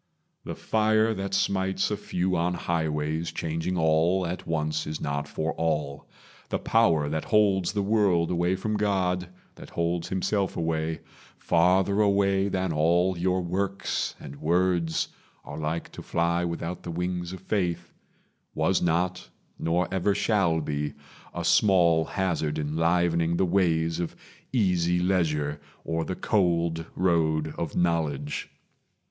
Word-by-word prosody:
The - - -5
fire 110 0 +2
that 100 -1 -3
smites 95 0 0
A - - +1
few 90 -2 -1
on 90 +1 0
highways, 80 -1 -1
changing 80 +3 -2
all 80 +3 +2
at 85 +1 -5
once, 75 -1 -1
Is 75 0 -4
not 70 0 -2
for 80 +3 -2
all. 75 -3 -2 0.4
The - - 0
power 85 -10 +2
that 80 +1 -2
holds 100 -4 +3
the 100 -2 0
world 100 -5 +2
Away 90 +1 +1
from 105 +3 -2
God 90 -3 0 0.3
that - - -11
holds 85 0 -1
himself 95 +1 -1
away 80 -1 -1 0.4
Farther 95 +4 +3
away 100 -1 +3
than 95 -2 -1
all 85 +4 +2
your 90 +1 0
works 95 +3 -2
and 70 - -9
words 85 +1 +1 0.4
Are 75 - -7
like 80 +2 -3
to - - -9
fly 85 +1 0
without 85 +1 -4
the - - -7
wings 90 +1 -3
of 95 - -8
faith 95 -4 -2 0.6
Was 80 +4 +2
not, 90 +2 0 0.3
nor 85 +2 +1
ever 95 +2 +1
shall 95 -7 +2
be, 75 -1 -3 0.4
a - - -4
small 85 -5 +4
hazard 85 -6 -1
Enlivening 85 +2 +1
the 95 - +3
ways 85 -3 +1
of 85 - -3 0.4
easy 90 -7 +2
leisure 75 -6 0 0.2
Or 80 0 -1
the 95 - -4
cold 85 -5 +1
road 80 -4 +1
of 85 -3 -4
knowledge. 80 -5 -1
85 Hz, 140 wpm, -26 LUFS, 80-95 Hz, 0.6 s, small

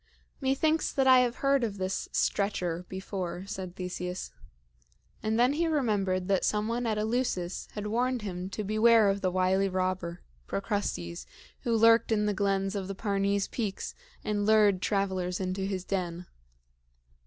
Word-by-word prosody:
"Methinks 310 +4 +1
that 270 - +1
I 260 -1 +8
have 245 -1 +1
heard 275 -2 +4
of 210 -3 -2
this 190 0 -2
Stretcher 180 -4 -1
before," 190 -1 -5
said 190 -3 -6
Theseus; 180 0 -5 0.9
and 220 +1 0
then 250 +3 +4
he 330 +3 +1
remembered 205 - 0
that 195 -2 +2
some 210 0 +1
one 235 +1 -1
at 215 -1 0
Eleusis 215 -5 -1
had 210 -1 -5
warned 245 +2 0
him 185 -2 -4
to 215 - -4
beware 215 +1 +5
of 200 0 -3
the 185 - +1
wily 185 +2 +2
robber, 185 -2 -2 0.2
Procrustes, 90 - -3 0.3
who 230 -2 0
lurked 230 0 +5
in 210 -1 +2
the 210 - +1
glens 195 -1 0
of 195 -2 -3
the 195 - -5
Parnes 200 -1 0
peaks 210 -5 -4 0.3
and 205 -1 -1
lured 210 -3 +4
travelers 190 -3 -1
into 185 0 -2
his 190 -2 -3
den. 180 -2 -3
200 Hz, 155 wpm, -29 LUFS, 185-225 Hz, 0.9 s, I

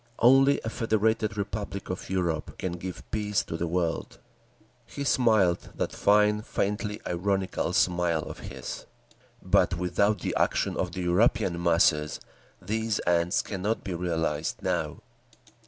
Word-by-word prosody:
Only 135 +3 +5
a 110 - -2
Federated 110 -1 0
Republic 100 -2 -4
of 90 - -6
Europe 85 -5 -2
can 95 - -3
give 90 +1 -6
peace 105 -1 0
to - - -6
the 85 +1 -2
world." 85 -1 -2 0.7
He 140 - -5
smiled—that 110 -10 +2
fine, 105 +1 +3
faintly 105 0 -2
ironical 95 +2 -1
smile 85 -3 +2
of - - -8
his. - - -7 0.6
"But 90 - +3
without 100 +4 +1
the - - -2
action - - +1
of - - -2
the 90 - -4
European 90 -1 +2
masses, 85 -3 +2 0.4
these 110 +3 -1
ends 85 0 +2
cannot 105 +3 -2
be 95 - -4
realised—now…." 80 -1 -2
95 Hz, 125 wpm, -27 LUFS, 85-105 Hz, 0.7 s, Only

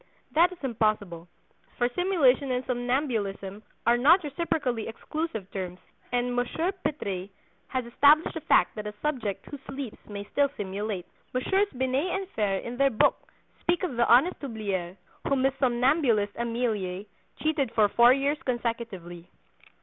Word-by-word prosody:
That 345 +4 +5
is 365 - -9
impossible, 215 -8 -1 0.5
for 240 - +2
simulation 300 -7 +3
and 250 0 -1
somnambulism 240 -6 -2 0.2
are 235 +1 +5
not 335 +8 +6
reciprocally 285 -6 -2
exclusive 225 - -4
terms, 180 -2 -5 0.3
and 245 0 0
Monsieur 320 +9 0
Pitres 200 - -4 0.4
has 255 -2 -2
established 285 +6 +4
the 320 - -5
fact - - +3
that 210 -1 -5
a 210 - -6
subject 250 -10 -2
who 285 - -8
sleeps 270 -4 -6
may 200 -1 -5
still 285 -1 +3
simulate." 200 -1 -3 0.3
Messieurs 385 +11 +2
Binet 260 +8 0
and 390 -1 -3
Fere 205 - 0
in 240 +1 -6
their 275 +1 +4
book 225 - +1 0.3
speak 345 +1 0
of 305 -9 -2
"the 235 0 +2
honest 270 +10 +5
Hublier, 200 -8 -3 0.3
whom 275 -2 +2
his 270 0 +3
somnambulist 245 -4 +2
Emelie 220 -5 -2 0.3
cheated 300 -6 0
for 215 -2 +5
four 235 +4 +6
years 275 +2 +1
consecutively." 230 -9 -4
245 Hz, 145 wpm, -27 LUFS, 210-285 Hz, 0.5 s, not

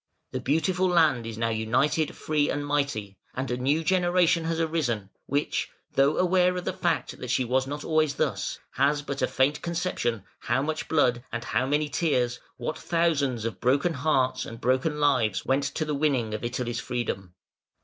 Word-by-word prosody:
The 130 - -2
beautiful 160 +8 +1
land 155 -10 +3
is 115 -1 -6
now 115 0 0
united, 125 +8 +1
free, 150 -1 0
and 145 0 -2
mighty; 140 -9 -2 0.2
and 130 0 -3
a - - +1
new 140 +6 +1
generation 175 -1 +3
has 165 0 -1
arisen, 135 -12 -1 0.2
which, 145 +2 -1 0.2
though 140 +2 +3
aware 180 0 +3
of 180 - -4
the - - -1
fact - - -1
that - - -6
she 130 - +1
was 130 +2 +1
not 145 +1 -5
always 155 -2 +1
thus, - - -1
has 145 +2 +1
but 140 -1 -4
a - - +3
faint 140 +3 +1
conception 170 - -2 0.2
how 135 - 0
much 155 +1 -3
blood 125 -6 +2
and 120 0 -3
how 130 - 0
many 150 +2 +1
tears, 130 -5 0 0.2
what 155 - -4
thousands 145 -9 +1
of 115 - -4
broken 140 +7 +2
hearts 130 -3 +1
and 115 0 -8
broken 130 +5 +1
lives 130 -9 +2
went 135 +1 +1
to 140 +3 -2
the 150 - -2
winning 135 -7 +1
of 110 - -4
Italy's 120 0 -2
freedom. 95 -8 -4
140 Hz, 180 wpm, -27 LUFS, 125-155 Hz, 0.2 s, land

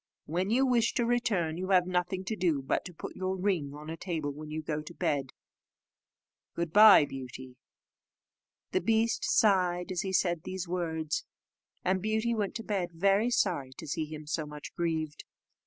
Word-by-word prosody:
When 180 +5 -1
you 255 +4 +3
wish 240 -3 +2
to 240 - +2
return, 200 -9 0
you 185 - -3
have 185 -2 +5
nothing 180 +1 -1
to 220 - -2
do 165 -8 +1
but 135 - 0
to 180 - -8
put - - -7
your 185 0 -2
ring 180 -7 -1
on 150 +1 -10
a 160 - -4
table 165 -4 -3
when 150 +2 -9
you 155 +1 -4
go 155 0 -2
to 150 - -11
bed. 135 -3 0 1.3
Good 170 -1 -2
bye, 210 -7 +9
Beauty!" 130 -1 -8 1.2
The 370 - +1
beast 225 0 +1
sighed 180 -4 +2
as 180 - -1
he 190 - -3
said 175 -3 +1
these 185 +1 -5
words, 160 -3 -2 0.6
and 185 0 +1
Beauty 220 +3 0
went 210 -3 -2
to 225 - -4
bed 195 -5 -1
very 195 +6 +3
sorry 135 - 0
to - - -8
see 155 +2 -2
him 155 0 -8
so 155 0 -2
much 150 0 -9
grieved. 160 -3 -2
175 Hz, 180 wpm, -30 LUFS, 155-195 Hz, 1.3 s, bye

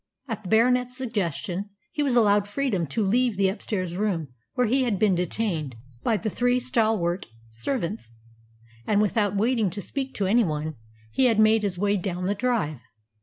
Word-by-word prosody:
At 225 -3 -4
the 190 - -8
Baronet's 250 +3 +3
suggestion, 200 - -3 0.2
he 295 - -2
was 275 -4 +1
allowed 205 -3 +4
freedom 205 - -1
to 205 +9 -1
leave 235 +1 +2
the 195 -1 +3
upstairs 185 -3 -3
room 180 -7 -1 0.3
where 250 - +3
he 260 +4 +2
had 235 -6 +1
been 205 0 +3
detained 175 - -1 0.3
by 225 - +1
the 215 - -4
three 245 +4 +1
stalwart 220 -8 0 0.2
servants; 170 - -3 0.8
and, 205 - +3
without 210 -1 +1
waiting 220 0 +2
to 205 - -6
speak 265 +7 -4
to 200 - 0
any 230 +5 +4
one, 155 -3 -2 0.4
he 260 - +2
had 230 -4 +4
made 215 0 +5
his 200 -3 -2
way 205 +2 +1
down 180 -1 -3
the 200 - +1
drive. 205 - -1
210 Hz, 175 wpm, -25 LUFS, 185-240 Hz, 0.8 s, made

